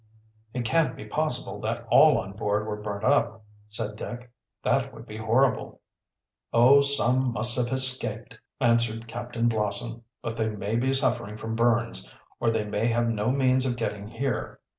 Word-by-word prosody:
"It 125 -2 -2
can't 160 +7 +1
be - - -9
possible 155 -5 -3
that - - -3
all - - +7
on 95 - -4
board 105 +1 -1
were 105 -1 -5
burnt 105 0 -5
up," 110 0 +1 0.2
said 105 0 -5
Dick. 120 +2 -7 0.3
"That - - +1
would - - -11
be 105 - -9
horrible." 115 +4 +1 0.7
"Oh, 130 +4 +6
some 130 -2 +3
must 120 +2 +1
have 125 -1 +1
escaped," 125 -3 +1 0.2
answered 115 -2 +1
Captain 120 0 -3
Blossom. 110 +1 -1 0.2
"But 115 - -4
they 110 -1 0
may 105 +1 -3
be 130 +3 +1
suffering 115 -6 0
from 110 +1 -5
burns, 115 - +1 0.3
or 115 - +1
they 110 -1 0
may 105 +2 -1
have 120 0 +1
no 110 0 -1
means 130 -1 +2
of 120 -1 -2
getting 105 -3 -4
here. 115 0 -3
115 Hz, 165 wpm, -26 LUFS, 110-125 Hz, 0.7 s, all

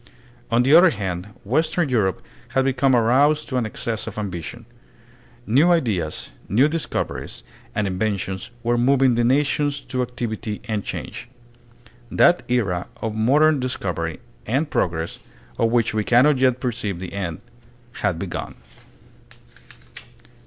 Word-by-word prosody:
On 120 +1 +3
the 135 +4 +3
other 175 +2 +8
hand 95 - -4 0.2
western 155 - +1
Europe 105 -7 0 0.3
had 135 - +3
become 135 0 +3
aroused 140 +6 +3
to 130 - -1
an 120 -3 0
excess 110 0 -4
of - - -7
ambition. 100 +3 -5 0.8
New 140 +11 +4
ideas, 105 - 0 0.2
new 125 +8 +4
discoveries 160 +1 -4 0.3
and 105 - +1
inventions 95 0 -2
were 120 +1 +1
moving 130 0 +4
the 120 +1 +1
nations 145 +3 +1
to 130 0 -3
activity 115 -3 -4
and 105 -3 -2
change. 120 - -6 0.8
That 175 +1 +4
era 100 -8 0
of 110 -1 -3
modern 140 +7 +3
discovery 90 -10 -3 0.3
and 140 +7 0
progress, 85 -1 -1 0.4
of 115 - +3
which 115 -1 +1
we 110 -1 0
cannot 130 +5 +4
yet 130 -1 +3
perceive 110 -7 -2
the 90 0 -7
end, 90 -5 -3 0.6
had 85 - 0
begun. 90 0 -5
120 Hz, 130 wpm, -22 LUFS, 100-135 Hz, 0.8 s, other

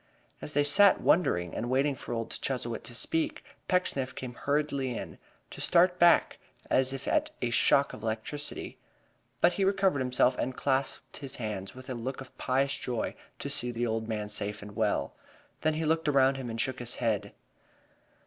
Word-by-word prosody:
As 150 - -6
they 145 - +3
sat 195 +7 +6
wondering 90 - +2
and 120 - -3
waiting 135 +3 +2
for 130 - -9
old 115 -1 -3
Chuzzlewit 120 -4 -3
to 120 - -5
speak, 310 - -1 0.2
Pecksniff 140 -8 0
came 125 -2 -6
hurriedly 140 -2 -1
in, - - -7 0.3
to - - -7
start 180 +1 +4
back 170 0 +5 0.3
as 130 0 +4
if 135 0 -6
at - - +2
a 120 - -1
shock 140 +3 +4
of - - -9
electricity. 110 +7 -4 0.6
But 180 - +5
he 195 - 0
recovered 190 -5 +2
himself, 125 0 +2
and 130 0 -2
clasped 135 -1 -1
his 135 -3 -6
hands 105 -4 -5
with 130 +1 -11
a 130 - -3
look 125 +3 -4
of 130 - -11
pious 135 +2 +1
joy 120 -2 -2 0.2
to - - -5
see 125 - 0
the 120 0 -1
old 110 -1 -2
man 105 -2 -2
safe 105 0 -3
and 105 0 -10
well. - - 0 0.5
Then 155 0 +1
he 160 +1 -1
looked 160 0 +1
around 135 -2 +4
him 130 -3 -5
and 115 0 -5
shook 130 +1 -1
his 120 0 -3
head. 110 -4 -1
130 Hz, 185 wpm, -29 LUFS, 120-145 Hz, 0.6 s, sat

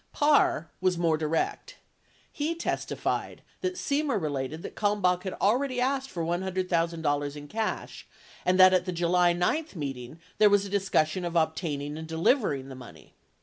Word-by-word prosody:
54 290 - +1
Parr 170 - +3
was 185 -1 +2
more 165 -2 +2
direct; 160 - -2 0.6
he 310 +2 -2
testified 335 - -3 0.2
that 370 0 -2
Semer 285 - 0
related 150 0 -3
that - - -7
Kalmbach 200 -4 +1
had 190 - -3
already 250 +5 +1
asked 270 +1 0
for 170 -8 -4
$100,000 170 -5 -1
in 145 0 -9
cash 220 +5 -4 0.4
and 185 +1 +2
that 185 0 +8
at 180 -1 +2
the 185 - -2
July 175 +1 +3
9 180 - 0
meet 140 -5 -4
ing 125 +6 -10 0.2
there 210 - +7
was 200 0 +3
a - - -6
discussion 185 -4 +1
of 175 0 -4
obtaining 155 -2 -1
and 160 - -7
delivering 160 - +1
the - - -8
money. 120 -12 -13
180 Hz, 165 wpm, -28 LUFS, 155-210 Hz, 0.6 s, that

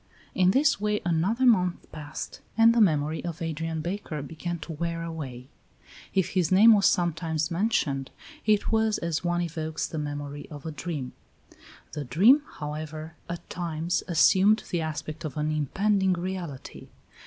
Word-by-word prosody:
In 185 -1 +4
this 275 +1 +3
way 210 0 +1
another 185 +10 +1
month 180 -7 +3
passed, 150 -2 -7 0.2
and 230 +1 +7
the 235 - +3
memory 155 -4 +2
of 170 -2 -5
Adrian 165 0 -3
Baker 170 -4 -4
began 165 +4 -5
to 165 - -7
wear 165 +1 -3
away; 135 -7 -6 0.7
if 190 -2 +2
his 180 -3 0
name 215 +5 +8
was 200 -2 +4
sometimes 165 -2 0
mentioned, 165 -8 0 0.3
it 210 -1 +2
was 220 -1 +2
as 170 -1 -2
one 175 0 0
evokes 160 -2 -3
the 160 - -5
memory 145 -1 -5
of 145 -1 -10
a 160 - -3
dream. 150 -5 -5 0.8
The 150 - -4
dream, 200 - +5
however, 155 +1 -6 0.2
at 170 0 -6
times 170 0 -2
assumed 190 +5 +4
the 175 - 0
aspect 155 0 -5
of 155 -4 -5
an 150 +1 0
impending 190 +6 +1
reality. 175 -6 -6
165 Hz, 155 wpm, -27 LUFS, 155-190 Hz, 0.8 s, name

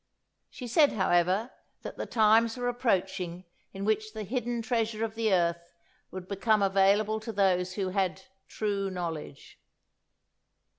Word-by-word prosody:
She 250 - -9
said, 285 +5 +4
however, 190 +3 +1 0.3
that - - -7
the - - -4
times 225 +1 +3
were 245 0 -2
approaching 190 -7 -1 0.3
in 195 0 -6
which 215 0 0
the 220 -1 -5
hidden 240 +2 -3
treasure 225 -2 -1
of 220 - -6
the 225 -1 0
earth 170 -1 0 0.3
would 185 -1 -8
become 205 +1 +1
available 200 +3 +3
to 220 +1 -6
those 185 -3 +1
who 190 -1 -2
had 190 0 -1 0.2
'true 200 -2 -2
knowledge.'" 165 - -6
205 Hz, 140 wpm, -28 LUFS, 185-225 Hz, 0.3 s, said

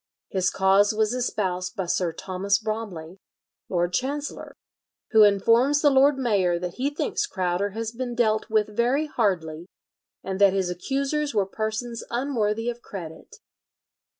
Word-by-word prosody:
His 190 -1 +1
cause 195 +2 +3
was 220 +1 +1
espoused 185 -7 -2
by 190 - -2
Sir 175 0 0
Thomas 190 +3 -1
Bromley, 200 -6 -5 0.5
Lord 175 -1 0
Chancellor, 285 +5 -3 0.6
who 220 - +6
informs 230 +8 +4
the 290 - +6
lord 270 +1 +4
mayor 200 -9 +1
that 175 0 -5
he 265 +3 0
thinks 415 +8 -2
Crowder 185 - -1
has 225 -1 -3
been 245 0 -5
dealt 220 -2 +1
with 215 -1 0
very 250 +7 +2
hardly, 175 - -1 0.6
and 190 +1 -4
that 200 -1 +6
his 190 -2 0
accusers 275 - -2
were 200 -2 +2
persons 220 +3 -4
unworthy 230 -3 -1
of 240 0 -3
credit. 165 -8 -9
215 Hz, 145 wpm, -25 LUFS, 185-245 Hz, 0.6 s, who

